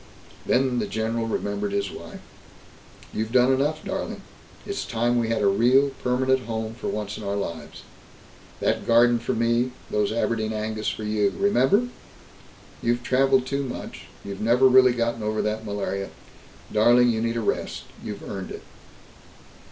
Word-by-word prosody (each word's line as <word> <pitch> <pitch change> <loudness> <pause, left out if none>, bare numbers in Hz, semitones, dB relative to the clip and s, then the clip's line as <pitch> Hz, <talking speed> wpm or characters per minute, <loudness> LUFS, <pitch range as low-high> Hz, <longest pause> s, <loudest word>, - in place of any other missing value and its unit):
Then 125 -1 +2
the - - -1
general 110 +2 -2
remembered 100 -2 -2
his 100 -1 -1
wife: - - -10 0.9
"You've 110 +1 -2
done 125 +1 +4
enough, 150 +4 0
darling. 195 0 -4 0.4
It's 400 - -3
time 120 +1 0
we 115 -1 -1
had 115 -2 0
a - - +4
real 125 +8 +4
permanent 130 +1 +1
home 110 -1 -3
for 120 - -6
once 105 0 -4
in - - -8
our 100 0 -2
lives. 85 -5 -5 0.8
That - - 0
garden 120 +1 +5
for - - -2
me, 120 +2 +1 0.2
those 105 -1 +1
Aberdeen 110 -1 -1
Angus 110 0 -3
for 110 - -5
you 105 -1 +1
remember? 200 - +3 0.9
You've 120 +1 0
traveled 130 +1 +3
too 140 +1 -1
much; 130 -3 -7 0.2
you've 100 -1 -6
never 120 +4 +5
really 130 -1 +6
gotten 115 -1 -1
over 110 0 -1
that 110 +1 -2
malaria. 100 -1 -3 0.6
Darling, 120 +3 +5
you 110 -1 -1
need 115 0 -1
a - - 0
rest. 105 - -2 0.2
You've 105 -1 -7
earned 95 -2 -5
it." - - -8
115 Hz, 160 wpm, -24 LUFS, 105-125 Hz, 0.9 s, really